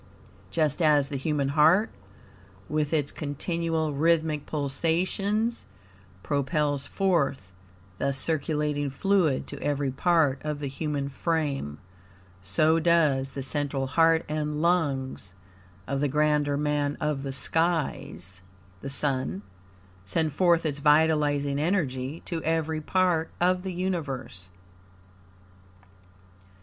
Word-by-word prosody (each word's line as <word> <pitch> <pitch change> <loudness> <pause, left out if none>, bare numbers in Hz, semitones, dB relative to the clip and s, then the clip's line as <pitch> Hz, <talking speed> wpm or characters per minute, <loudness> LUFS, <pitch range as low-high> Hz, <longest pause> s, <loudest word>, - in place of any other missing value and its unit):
Just 155 0 0
as 150 -3 +4
the 145 - -4
human 140 0 -1
heart, 160 +9 +4 0.8
with 150 -1 -1
its 150 -3 0
continual, 160 +1 -2
rhythmic 155 0 +1
pulsations, 185 - -1 0.6
propels 145 0 0
forth 140 - 0 0.5
the 140 - +1
circulating 150 0 -1
fluid 165 -1 +1
to 145 - -9
every 145 -2 -1
part 145 -2 +2
of 150 -1 -2
the 145 - -5
human 140 0 -3
frame; 140 - -2 0.6
so 155 - +2
does 155 -5 +2
the 135 - -4
central 140 -1 -1
heart 165 +3 +3
and 150 0 -2
lungs 140 - 0 0.5
of 135 +3 -2
the 145 - +2
Grander 150 0 +1
Man 145 -1 0
of 150 -2 -1
the 135 0 -4
Skies, 140 - -1 0.4
(the 140 - -6
Sun) 130 - -1 0.6
send 155 - -1
forth 170 0 +3
its 145 -2 -2
vitalizing 150 -2 +3
energy 150 -4 -1
to 165 -2 -3
every 160 -1 0
part 175 -1 +1
of 180 +1 +2
the 190 0 -4
universe. 145 - -4
150 Hz, 110 wpm, -27 LUFS, 140-165 Hz, 0.8 s, as